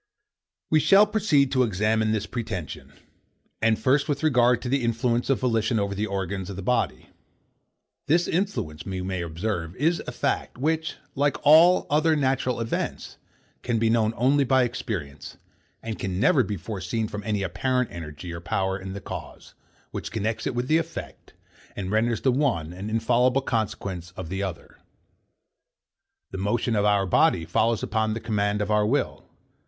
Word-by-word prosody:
We 155 Hz, -, +5 dB
shall 195 Hz, +6 st, +6 dB
proceed 155 Hz, -12 st, +2 dB
to 130 Hz, -, +2 dB
examine 110 Hz, 0 st, +1 dB
this 110 Hz, -2 st, -1 dB
pretension; 110 Hz, -, -5 dB, 0.7 s
and 110 Hz, -1 st, +3 dB
first 135 Hz, +6 st, +2 dB
with 145 Hz, +1 st, -1 dB
regard 125 Hz, -5 st, +4 dB
to -, -, -3 dB
the 135 Hz, 0 st, +1 dB
influence 115 Hz, +1 st, 0 dB
of 135 Hz, -, +2 dB
volition 115 Hz, -2 st, +1 dB
over 100 Hz, 0 st, -1 dB
the 105 Hz, +2 st, -2 dB
organs 95 Hz, -1 st, -3 dB
of 100 Hz, -, -6 dB
the 95 Hz, -, -6 dB
body. 125 Hz, +3 st, -1 dB, 1.0 s
This 170 Hz, +4 st, +3 dB
influence, 160 Hz, -, -2 dB
we 95 Hz, -1 st, -4 dB
may 95 Hz, -1 st, -3 dB
observe, 85 Hz, +1 st, -3 dB
is 165 Hz, -, +1 dB
a -, -, -3 dB
fact, -, -, -2 dB
which, 160 Hz, +4 st, -1 dB, 0.2 s
like 145 Hz, +1 st, +1 dB
all 165 Hz, +5 st, +7 dB
other 155 Hz, +2 st, +3 dB
natural 130 Hz, -4 st, 0 dB
events, 115 Hz, -1 st, -3 dB, 0.4 s
can 120 Hz, -2 st, -1 dB
be 110 Hz, 0 st, +2 dB
known 115 Hz, -1 st, +2 dB
only 140 Hz, +4 st, +3 dB
by 130 Hz, 0 st, +3 dB
experience, 90 Hz, -, -5 dB, 0.5 s
and 110 Hz, -1 st, -5 dB
can 95 Hz, -1 st, -3 dB
never -, -, +4 dB
be 105 Hz, -, -2 dB
foreseen 100 Hz, +4 st, -3 dB
from 105 Hz, 0 st, -6 dB
any 105 Hz, -1 st, -1 dB
apparent 125 Hz, +8 st, -1 dB
energy 85 Hz, +1 st, -7 dB
or 85 Hz, -, -6 dB
power 95 Hz, +1 st, -1 dB
in 95 Hz, 0 st, -7 dB
the 100 Hz, -, -6 dB
cause, -, -, -9 dB, 0.4 s
which -, -, -5 dB
connects 110 Hz, 0 st, -2 dB
it 130 Hz, -, -3 dB
with 120 Hz, +1 st, -1 dB
the 155 Hz, +3 st, +4 dB
effect, 165 Hz, -, -7 dB, 0.4 s
and 95 Hz, -1 st, -4 dB
renders 110 Hz, +1 st, +1 dB
the 130 Hz, -, +3 dB
one 120 Hz, -, 0 dB
an 95 Hz, +4 st, -6 dB
infallible 120 Hz, +4 st, +2 dB
consequence 95 Hz, -7 st, -3 dB
of 90 Hz, -3 st, -6 dB
the 95 Hz, +2 st, -3 dB
other. 95 Hz, -4 st, -6 dB, 1.5 s
The 95 Hz, -, -5 dB
motion 110 Hz, +4 st, 0 dB
of 105 Hz, 0 st, +2 dB
our 100 Hz, -1 st, +3 dB
body 85 Hz, -2 st, +3 dB
follows 110 Hz, +6 st, +1 dB
upon 110 Hz, 0 st, 0 dB
the -, -, -3 dB
command 105 Hz, -2 st, 0 dB
of 105 Hz, -, -3 dB
our 105 Hz, 0 st, +3 dB
will. 140 Hz, +6 st, -1 dB
110 Hz, 170 wpm, -25 LUFS, 95-130 Hz, 1.5 s, all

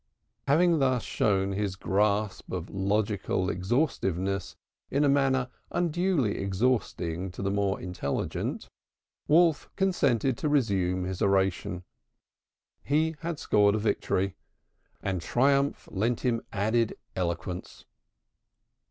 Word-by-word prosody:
"_ -, -, -53 dB, 0.4 s
Having 165 Hz, +3 st, +4 dB
thus 130 Hz, -4 st, +2 dB
shown 95 Hz, +3 st, +1 dB
his 100 Hz, -1 st, -2 dB
grasp 100 Hz, +1 st, 0 dB
of 90 Hz, 0 st, -4 dB
logical 100 Hz, -1 st, 0 dB
exhaustiveness 95 Hz, -, -1 dB, 0.3 s
in 140 Hz, +2 st, +1 dB
a -, -, +4 dB
manner 135 Hz, -2 st, +2 dB, 0.2 s
unduly 175 Hz, -, 0 dB
exhausting 95 Hz, -4 st, -1 dB
to 90 Hz, -, -7 dB
the 100 Hz, -, 0 dB
more 100 Hz, -1 st, 0 dB
intelligent, 90 Hz, -6 st, -3 dB, 0.6 s
Wolf 165 Hz, 0 st, +4 dB
consented 135 Hz, -, +1 dB
to 150 Hz, -, 0 dB
resume 95 Hz, -10 st, +1 dB
his 90 Hz, -1 st, -4 dB
oration. 95 Hz, -2 st, +1 dB, 1.0 s
He 160 Hz, +3 st, +1 dB
had 165 Hz, -1 st, -3 dB
scored 105 Hz, -6 st, +3 dB
a -, -, +1 dB
victory, 100 Hz, -3 st, 0 dB, 0.7 s
and 95 Hz, -3 st, -1 dB
triumph 140 Hz, +6 st, +1 dB
lent 115 Hz, +4 st, 0 dB
him 120 Hz, -3 st, +1 dB
added 110 Hz, +2 st, +1 dB, 0.2 s
eloquence. 90 Hz, 0 st, -4 dB
105 Hz, 110 wpm, -28 LUFS, 95-135 Hz, 1.0 s, Having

